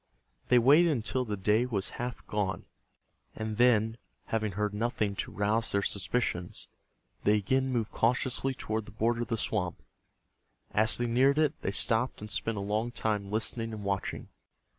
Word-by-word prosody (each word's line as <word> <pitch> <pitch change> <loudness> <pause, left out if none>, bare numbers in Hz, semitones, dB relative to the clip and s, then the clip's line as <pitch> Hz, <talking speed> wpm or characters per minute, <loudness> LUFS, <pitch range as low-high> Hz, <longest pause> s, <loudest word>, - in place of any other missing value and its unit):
They 125 - +5
waited 145 +8 +6
until 130 -2 0
the 105 -2 -3
day 105 +5 +2
was 100 -6 -2
half 125 0 -5
gone, 105 -3 -2 0.7
and 110 -1 -4
then, 115 -2 +4 0.3
having 110 -3 -1
heard 105 +1 -1
nothing 105 -2 -1
to - - -3
rouse 110 +3 0
their 100 0 +1
suspicions, 90 -2 -2 0.6
they 105 +1 +4
again 130 +6 +1
moved 115 -3 -1
cautiously 130 +3 +1
toward 110 -2 -3
the - - -10
border 115 +3 0
of 120 - -2
the 115 - -1
swamp. 90 -5 -2 0.9
As 110 +1 +4
they 120 - 0
neared 130 +4 +3
it, 155 -2 +3
they - - -1
stopped 115 +5 0
and 105 +1 -7
spent 115 0 -1
a - - -2
long 105 +4 -1
time 105 -4 -2
listening 115 +1 -2
and 105 -2 -6
watching. 100 -1 -3
110 Hz, 165 wpm, -30 LUFS, 105-120 Hz, 0.9 s, waited